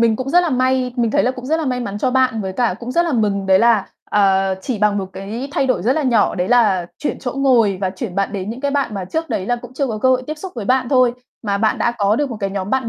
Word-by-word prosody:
mình 230 -2 +3
cũng 255 +1 -4
rất 355 +2 +5
là 345 - -1
may 255 -1 +1
mình 235 -2 +1
thấy - - +2
là 250 - +2
cũng 255 -1 -8
rất 315 +4 +1
là 325 - -2
may 250 -1 -1
mắn 205 -3 -4
cho 255 - 0
bạn. 255 -3 +2
Với 190 -1 -4
cả 230 0 0
cũng 240 +1 -5
rất 340 - +3
là 330 - -1
mừng 205 -4 0
đấy 190 0 +5
là, 225 -4 +3 0.2
ờ, 195 -1 +3
chỉ 250 -5 -3
bằng 210 0 +2
một 195 - -3
cái 220 +8 -6
thay 275 - +1
đổi 255 -8 0
rất 240 - +2
là 310 +2 -1
nhỏ, 235 -6 +2
đấy 180 +1 -2
là 210 -8 +3
chuyển 295 - -3
chỗ 250 -2 -4
ngồi 245 -8 +2
và 190 -1 0
chuyển 190 0 -6
bạn 195 +1 -1
đến 200 +1 -4
những 240 - -7
cái 285 0 -1
bạn 280 -6 -1
mà 190 -2 -4
trước 320 - -3
đấy 185 - -2
là 245 - +1
cũng 240 - -11
chưa 275 +1 0
có 220 -3 -3
cơ 260 - +2
hội 255 0 +3
tiếp 310 - -3
xúc 375 +2 -7
với 225 - -5
bạn 255 +3 +1
thôi, 255 -2 +4 0.3
mà 200 -3 -1
bạn 220 0 +1
đã 240 - +1
có 205 +1 +2
được 290 0 -1
một 230 - -5
cái 195 -1 -1
nhóm 195 0 -4
bạn 260 -3 0
235 Hz, 315 wpm, -19 LUFS, 200-260 Hz, 0.3 s, rất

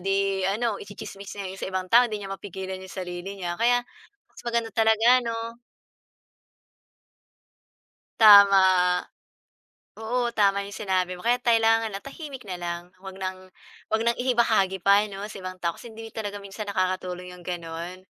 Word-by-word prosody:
di 195 0 +1 0.3
ano 210 +5 0
itsitsismis 200 0 -9
niya - - -4
'yon 190 +1 -9
sa - - -2
ibang 185 0 -2
tao, 240 +5 +7
'di 215 -3 -4
niya 195 - -7
mapigilan 190 -1 -6
'yong 190 - -11
sarili 180 +2 -6
niya. 175 -1 -3
Kaya 245 +1 +3 0.5
mas - - -15
maganda 235 -1 -1
talaga 225 +2 +4
'no. 230 0 -4 2.6
Tama. 200 -2 +9 1.4
Oo, 240 +2 -1
tama 200 -3 +2
'yong 200 0 -8
sinabi 185 -1 0
mo. 180 - -12
Kaya 245 +1 +2
kailangan 225 -2 +3
na 195 - -5
tahimik 275 -4 -9
na 185 -2 -5
lang. 170 0 -4 0.2
Huwag 190 0 -9
ng 185 -1 -4 0.5
huwag 220 +1 +1
ng 235 0 +2
ibahagi 225 -6 +2
pa 200 +3 +5
'no 195 +1 -6
sa 210 -1 -9
ibang 185 0 -7
tao. 170 -2 -1
Kasi 240 - -12
hindi 225 0 -10
talaga 205 -2 -4
minsan 200 +1 -7
nakakatulong 185 -1 -2
'yong 180 - -13
gano'n. 170 0 -6
200 Hz, 160 wpm, -25 LUFS, 185-225 Hz, 2.6 s, Tama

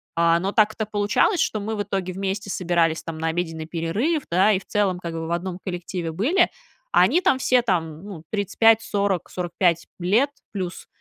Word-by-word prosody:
А, 170 0 +3
но 195 +3 -2
так-то 215 0 +2
получалось, 210 - +1
что 215 - 0
мы 220 +2 -3
в 205 - -1
итоге 185 -2 -3
вместе 195 +1 -3
собирались 170 -3 +1
там 165 -1 -6
на 160 +1 -2
обеденный 165 -1 -2
перерыв, 200 - -1
да, 190 +5 +4
и 190 - +1
в - - -18
целом, 195 -4 0
как 170 -2 -5
бы, 165 0 -4
в - - -5
одном 175 +1 -3
коллективе 175 -2 -4
были, 290 - +3 0.5
а - - +6
они 350 - +4
там 310 -7 +2
все 255 -1 +3
там, 165 -8 -1
ну, 190 -6 -9
35-40-45 200 -5 +1
лет 210 +11 +2 0.2
плюс, 185 -3 -5
185 Hz, 180 wpm, -23 LUFS, 170-210 Hz, 0.5 s, а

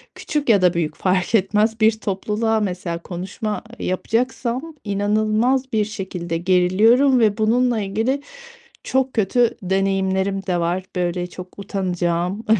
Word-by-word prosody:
küçük 295 -4 -3
ya 205 -4 +5
da 180 -1 +4
büyük 165 -3 -2
fark 185 +3 +1
etmez 210 +3 +2
bir 220 0 +3
topluluğa 215 +2 -1
mesela 180 -4 -3
konuşma 190 +5 -5 0.2
yapacaksam 250 - -2
inanılmaz 215 +6 +1
bir 215 -1 +2
şekilde 180 -5 -4
geriliyorum 205 +9 +4
ve 215 -2 +3
bununla 235 +2 +2
ilgili 220 +8 -1 0.6
çok 265 0 0
kötü 230 +2 +2
deneyimlerim 190 +1 0
de 180 -2 +1
var, 175 +2 -1
böyle, 175 0 -1
çok 180 +2 -11
utanacağım. 180 0 -2
200 Hz, 125 wpm, -21 LUFS, 185-225 Hz, 0.6 s, ya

